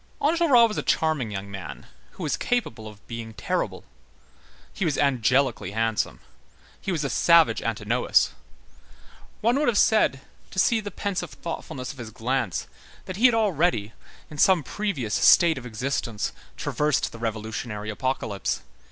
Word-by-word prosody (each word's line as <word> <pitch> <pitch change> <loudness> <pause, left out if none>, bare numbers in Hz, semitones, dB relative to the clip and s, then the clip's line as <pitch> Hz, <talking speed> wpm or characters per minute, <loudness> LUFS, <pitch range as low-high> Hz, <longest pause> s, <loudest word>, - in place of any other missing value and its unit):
Enjolras 295 -7 +5
was 215 - -3
a - - 0
charming 155 -8 +1
young 100 -1 -6
man, 90 -8 -8 0.3
who 185 - -8
was 150 - 0
capable 115 - -2
of 105 -1 -13
being 115 -1 -7
terrible. - - -2 0.9
He - - -3
was 155 -5 0
angelically 130 -6 +1
handsome. 110 0 -1 0.6
He 195 - -3
was 160 -4 -1
a - - 0
savage 170 -1 +5
Antinous. - - +1 1.1
One 235 +5 +3
would 300 - +1
have 235 -4 +2
said, 205 -13 +3 0.3
to - - -12
see 225 +5 +4
the 205 -1 -5
pensive 200 -1 -3
thoughtfulness 135 -6 -6
of 140 - -14
his 115 -2 -6
glance, 120 -2 -2 0.4
that 185 - -6
he 245 +5 +7
had 240 - +2
already, 170 - +1 0.4
in 150 - -8
some 185 -2 +5
previous 140 - -3
state 165 -5 +5
of 125 - -9
existence, 115 -3 -2 0.2
traversed 150 - 0
the 115 - -10
revolutionary 110 -1 -4
apocalypse. 110 -4 -2
135 Hz, 150 wpm, -25 LUFS, -, 1.1 s, he